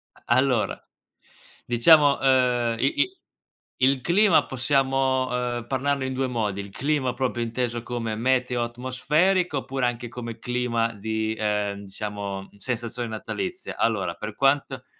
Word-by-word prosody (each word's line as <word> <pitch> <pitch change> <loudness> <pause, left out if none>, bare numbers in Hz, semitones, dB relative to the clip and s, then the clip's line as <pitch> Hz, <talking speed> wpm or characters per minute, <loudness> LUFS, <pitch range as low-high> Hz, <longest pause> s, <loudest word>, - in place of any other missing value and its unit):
A - - -23
allora, 130 -4 +1 0.9
diciamo, 140 +4 +5
ehm, 125 -3 +2
i 135 - 0
i 380 0 0 0.6
il 130 0 +3
clima 190 -2 +4
possiamo, 130 0 +1
ehm, 120 -1 -2
parlarne 135 0 0
in 130 - -3
2 135 +1 0
modi, 105 -5 -2
il 100 0 -10
clima 140 -1 0
proprio 125 -2 -1
inteso 120 0 -2
come 115 -3 -3
meteo 125 0 +1
atmosferico 145 +8 +1
oppure 135 -1 -2
anche 120 0 -2
come 115 -1 -7
clima 120 -2 -1
di, 110 +1 -2
ehm, 105 -1 -1
diciamo, 100 -1 -5
sensazione 120 +1 -4
natalizia. 180 - -5
Allora, 100 -7 0
per 105 0 -6
quanto 135 0 +1
125 Hz, 130 wpm, -25 LUFS, 115-135 Hz, 0.9 s, diciamo